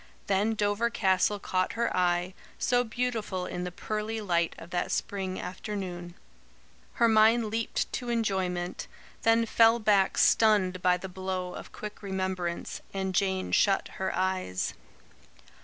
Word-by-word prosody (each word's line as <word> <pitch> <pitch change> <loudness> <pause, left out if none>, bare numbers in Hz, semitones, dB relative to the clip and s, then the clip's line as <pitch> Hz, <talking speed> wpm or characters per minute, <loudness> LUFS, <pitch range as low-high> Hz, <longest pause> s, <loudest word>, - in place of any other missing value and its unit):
Then 205 +3 +1
Dover 210 +2 +1
Castle 195 -2 +2
caught 185 -2 -1
her 235 +1 -1
eye, 180 0 +1 0.2
so 245 0 +2
beautiful 225 -6 -2
in 180 0 -4
the 180 - -4
pearly 215 +4 -3
light 170 -5 0
of 165 +2 -11
that 175 0 -1
spring 190 -2 -2
afternoon. 180 -2 -5 0.8
Her 235 - +3
mind 220 0 +4
leaped 225 0 -2
to 245 -2 -3
enjoyment, 190 -6 -1 0.3
then 225 0 +4
fell 230 +1 +5
back 205 -4 +2
stunned 195 -5 +4
by 180 0 +3
the 190 - -7
blow 185 -1 -4
of - - -9
quick 210 0 -8
remembrance, 185 -3 -3
and 190 -1 -2
Jane 190 0 0
shut 195 -2 +3
her 190 - 0
eyes. 185 - -1
190 Hz, 140 wpm, -28 LUFS, 185-220 Hz, 0.8 s, fell